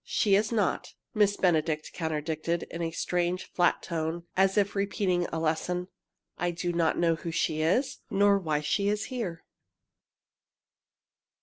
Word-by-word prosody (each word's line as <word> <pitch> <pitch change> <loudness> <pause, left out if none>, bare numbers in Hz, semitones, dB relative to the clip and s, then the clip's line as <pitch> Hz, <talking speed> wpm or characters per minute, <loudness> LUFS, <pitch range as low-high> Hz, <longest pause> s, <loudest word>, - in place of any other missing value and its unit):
"She 205 -3 +1
is 210 +3 +3
not," 210 -5 -1 0.2
Miss 205 -2 +3
Benedict 160 -3 +1
contradicted, 160 +1 -2
in 170 - -5
a 165 - 0
strange, 175 +2 -1
flat 175 -1 +2
tone, 165 0 -3
as 190 +1 +3
if 200 -1 +2
repeating 195 -3 0
a 165 - -4
lesson. 175 +3 -1 0.5
"I 175 - +1
do 175 0 -2
not 170 -1 +1
know 170 -1 +3
who 165 +1 -5
she 155 -1 0
is 190 - +1
nor 200 -1 +4
why 155 -5 -1
she 200 +7 0
is 210 +1 0
here!" 185 -10 -4
175 Hz, 145 wpm, -28 LUFS, 165-200 Hz, 0.5 s, nor